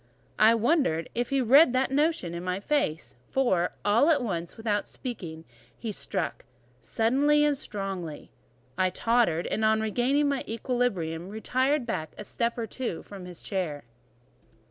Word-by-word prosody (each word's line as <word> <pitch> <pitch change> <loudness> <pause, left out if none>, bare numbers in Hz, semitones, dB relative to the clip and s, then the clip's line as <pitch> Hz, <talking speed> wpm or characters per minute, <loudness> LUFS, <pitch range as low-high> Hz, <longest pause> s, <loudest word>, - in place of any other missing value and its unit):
I 220 +2 +7
wonder 230 - +2
if 240 0 -1
he 275 -1 +1
read 260 +3 +6
that 260 +1 +1
notion 290 - +1
in 170 0 -5
my 185 +1 -2
face; 200 - -1 0.2
for, 190 -10 +1
all 230 +9 +4
at 290 -5 +3
once, 175 -6 -4
without 210 -2 -1
speaking, 170 - -7 0.3
he 225 - -4
struck 190 -3 -3 0.4
suddenly 280 - +2
and 295 -1 +2
strongly. 195 - -5 0.5
I 185 0 +3
tottered, 225 -5 +1
and 220 - -1
on 220 0 +4
regaining 245 +7 +1
my 280 -2 0
equilibrium 200 -8 -2
retired 255 +6 0
back 180 -9 -4
a - - -6
step 235 +3 -2
or 230 - -2
two 230 -5 -4
from 195 -3 -10
his 180 -1 -9
chair. 170 -8 -3
220 Hz, 150 wpm, -27 LUFS, 180-260 Hz, 0.5 s, I